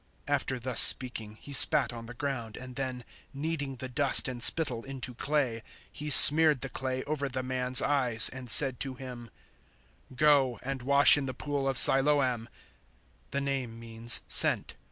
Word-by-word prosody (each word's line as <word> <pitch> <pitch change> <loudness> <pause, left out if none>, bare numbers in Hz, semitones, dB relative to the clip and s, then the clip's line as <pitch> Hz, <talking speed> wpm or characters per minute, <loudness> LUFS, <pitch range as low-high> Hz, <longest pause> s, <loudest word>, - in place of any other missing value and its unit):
009:006 - - -4
After 130 -1 -5
thus 125 -1 +3
speaking, 110 -4 +2
He 145 - -14
spat 135 -3 +1
on 115 -1 -13
the 120 - -13
ground, 120 -5 -9
and 125 0 -14
then, 130 -2 -8 0.3
kneading 145 -2 -8
the 130 +1 -11
dust 135 +2 0
and 125 -2 -9
spittle 125 -5 +2
into 135 -2 -10
clay, 130 -3 -5 0.3
He 150 +1 -11
smeared 150 0 +8
the 135 - -9
clay 130 0 -7
over 145 -2 -7
the 130 0 -8
man's 130 0 -2
eyes 125 -5 0
and 125 -1 -13
said 130 +1 +5
to 135 -2 -7
him, 125 -2 -13 0.8
009:007 130 - -18
"Go 135 -5 -1
and 135 0 -8
wash 140 +3 +4
in 135 - -8
the 130 - -9
pool 145 0 -7
of 135 -2 -5
Siloam" 135 -4 +1 0.8
the 140 - -6
name 130 -5 -8
means 115 0 -1
`Sent.' - - +1
130 Hz, 175 wpm, -25 LUFS, 125-140 Hz, 0.8 s, smeared